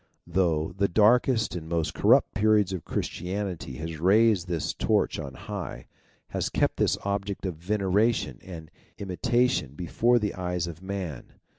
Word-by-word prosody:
Through 85 -1 +1
the 100 - +3
darkest 110 +3 +3
and 80 -2 -6
most 85 -2 -1
corrupt - - +4
periods 105 -2 +3
Christianity 90 -6 -4
has 80 +3 -6
raised 100 +1 +4
this 85 -4 -2
torch - - +1
on 70 -3 -6
high - - -6 0.4
has - - -2
kept - - 0
this - - +2
object 100 0 -2
of 90 -4 -3
veneration 100 +5 0
and 80 -5 -9 0.3
imitation 110 - 0
before 115 +9 +2
the 105 -3 -1
eyes 90 -2 -2
of 85 0 -8
man. 95 -8 -6
95 Hz, 140 wpm, -27 LUFS, 85-105 Hz, 0.4 s, corrupt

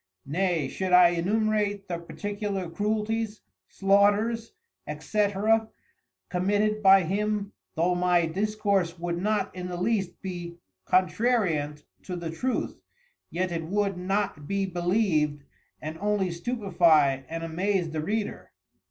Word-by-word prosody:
Nay 165 -1 0
should 185 +6 -3
I 180 -1 +8
enumerate 205 +3 0
the 170 -1 -3
particular 200 +1 -4
Cruelties, 215 +4 -2 0.3
Slaughters, 205 +4 +2 0.5
&c. 210 -1 +1 1.0
committed 205 +4 +1
by 195 -1 +7
him 205 +3 -1 0.2
though 175 +3 +2
my 175 -1 +3
discourse 200 -1 0
would 170 0 -3
not 210 -1 0
in 180 0 -5
the 180 -1 -4
least 190 -2 -1
be 175 -2 -6 0.3
contrariant 185 -7 +1 0.2
to 180 - -6
the 170 -2 -4
Truth, 250 +10 -2 0.5
yet 185 +1 -2
it 165 -1 -3
would 200 +2 0
not 185 -4 -2
be 200 0 0
beleived 175 -5 +1 0.4
and 155 +1 -6
only 205 -2 +1
stupifie 170 - +2
and 165 0 -4
amaze 175 +1 -1
the 155 -1 -2
Reader. 210 +6 -3
190 Hz, 120 wpm, -27 LUFS, 170-210 Hz, 1.0 s, I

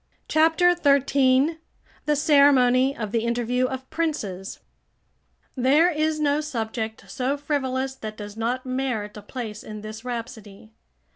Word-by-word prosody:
CHAPTER 325 +3 +4
XIII 280 0 +3 0.5
THE 300 - +3
CEREMONY 275 -3 +4
OF 215 -3 -4
THE 230 0 0
INTERVIEW 240 +2 0
OF 260 0 -6
PRINCES 210 - -3 1.0
There 285 +7 +4
is 310 0 0
no 295 0 +2
subject 225 -5 -4
so 270 +1 -2
frivolous 270 -2 -2
that 215 -4 -8
does 205 -1 -8
not 240 +3 -2
merit 255 -5 -2
a 210 - -8
place 215 -1 -7
in 215 -1 -8
this 215 +1 -8
rhapsody. 220 - -7
255 Hz, 130 wpm, -24 LUFS, 225-285 Hz, 1.0 s, CHAPTER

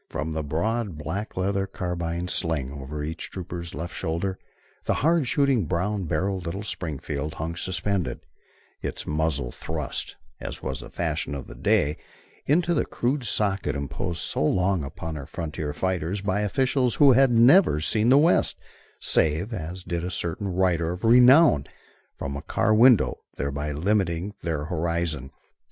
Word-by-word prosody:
From 80 +1 -3
the 80 0 -2
broad, 95 +6 -1
black 85 +9 -5
leather 95 +1 0
carbine 85 -2 -3
sling, 80 -7 0
over 70 +2 -6
each 80 +2 -5
trooper's 85 -2 -6
left 85 +3 -5
shoulder, 90 +4 -2 0.5
the - - +1
hard 165 -4 +3
shooting 135 - +2
brown 95 +3 -1
barrelled 95 +4 -1
little 95 +5 -4
Springfield 75 -5 -4
hung 80 +2 -4
suspended, 95 +1 -2 0.6
its - - -4
muzzle 75 -4 -1
thrust, - - -4 0.2
as - - -6
was 65 -1 -3
the - - -9
fashion 70 - -2
of 70 - -6
the - - -10
day, 75 +1 +1 0.5
into 170 +4 +3
the 155 - +2
crude 125 +2 -1
socket 100 -4 0
imposed 75 +4 -3
so - - 0
long 90 +1 +2
upon 80 +3 -6
our 70 -1 -7
frontier 80 -4 -4
fighters 95 +3 -2
by 100 +1 0
officials 125 +3 +1
who 140 -2 +7
had 135 +1 +5
never 120 - +6
seen 110 +8 +2
the 135 - +7
West, 160 +4 +3 0.4
save, 80 +9 +1
as 90 0 -5
did 85 -2 -3
a 90 - -2
certain 90 +2 -2
writer 90 -3 +1
of 90 +1 -6
renown, 125 - +7 0.5
from 70 0 -5
a 70 - -4
car 110 - +1
window, 120 +1 +5 0.2
thereby 70 +2 -2
limiting 90 +3 0
their 80 -3 -2
horizon. 85 -4 -2
90 Hz, 155 wpm, -25 LUFS, 80-105 Hz, 0.6 s, who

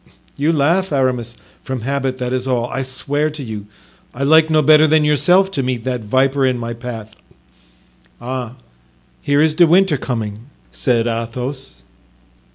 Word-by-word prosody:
"You 145 +3 +1
laugh 165 +5 +1
Aramis." 125 -4 -1 0.3
"From 130 -2 -5
habit, 135 +1 -2
that 125 -1 -3
is 130 0 -2
all. 125 -2 0
I 135 - -2
swear 140 +3 -2
to 150 -2 -8
you, 105 -4 -7 0.5
I 135 - -3
like 160 +2 +5
no 155 -1 +3
better 155 +1 +6
than 155 0 +3
yourself 180 +6 +3
to 140 - -2
meet 125 -3 -3
that 125 -1 -2
viper 135 +5 +1
in 130 -1 +1
my 120 0 -4
path." 115 -2 -8 1.1
"Ah! 125 -1 -5 0.7
here 145 +1 +2
is 160 -1 +2
De 170 +2 +5
Winter 180 -2 +3
coming," 115 -3 -5 0.2
said 115 - 0
Athos. 120 - -5
130 Hz, 160 wpm, -18 LUFS, 120-150 Hz, 1.1 s, better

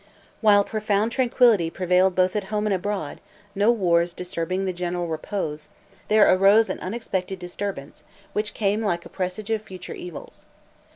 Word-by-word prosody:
While 205 -2 +6
profound 215 +1 0
tranquillity 235 -8 +3
prevailed 180 +1 +2
both 185 +1 +2
at 205 -2 -1
home 210 +1 -2
and 210 - +1
abroad, 190 -5 -3 0.3
no 205 +4 +3
wars 175 -6 +2
disturbing 180 +1 -3
the 185 - -1
general 175 0 -3
repose, 155 -2 -4 0.4
there 215 -1 +5
arose 200 +4 +5
an - - -5
unexpected 190 -2 -4
disturbance, 180 -4 -6 0.3
which 210 0 -2
came 205 0 0
like 175 -5 -1
a - - -10
presage 190 +3 -4
of 220 -1 0
future 185 -4 -9
evils. 175 -3 -10
190 Hz, 155 wpm, -24 LUFS, 180-210 Hz, 0.4 s, While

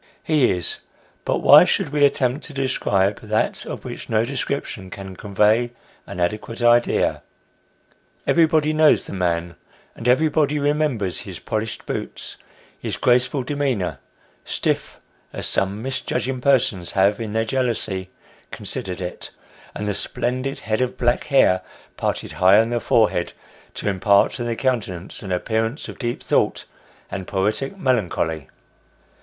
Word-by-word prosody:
He 150 -6 +3
is 90 -2 0 0.5
but - - 0
why - - +9
should - - 0
we 145 0 +1
attempt 140 0 +2
to 150 - -9
describe 105 -7 +1
that 110 0 -1
of - - -6
which - - -7
no 110 +1 +2
description 130 -7 -3
can 95 0 -8
convey 105 +5 +2 0.3
an 90 - -7
adequate 105 +6 -2
idea? 120 0 +3 1.0
Everybody 160 -2 +3
knows 155 0 +4
the - - -8
man, 85 -2 -1 0.4
and 115 - -5
everybody 150 +2 +3
remembers 145 -10 0
his - - -8
polished 110 0 -4
boots, - - -5 0.4
his - - -4
graceful 125 +2 +2
demeanour, 130 -9 -1 0.4
stiff, - - -2 0.3
as - - -5
some 100 +3 0
misjudging 130 -1 -2
persons 115 -10 +2
have 100 +1 +3
in 110 -2 -4
their 110 0 +1
jealousy 110 -7 -2 0.4
considered 95 0 -5
it, 90 0 -6 0.5
and 105 - -3
the 105 - 0
splendid 130 +6 -2
head 110 +2 -1
of 125 -1 -1
black 120 0 +1
hair, 95 -10 +4 0.3
parted - - -2
high 95 +3 +5
on 115 +1 +2
the 120 - +1
forehead, 110 -7 +2 0.4
to - - -4
impart 100 +1 +3
to 120 - -4
the 120 -1 -2
countenance 105 -8 -2
an 95 - -6
appearance 110 - -1
of - - -9
deep 120 -2 -3
thought - - +1 0.5
and 95 -2 -5
poetic 110 - -1
melancholy. 90 - 0
115 Hz, 140 wpm, -22 LUFS, 95-135 Hz, 1.0 s, why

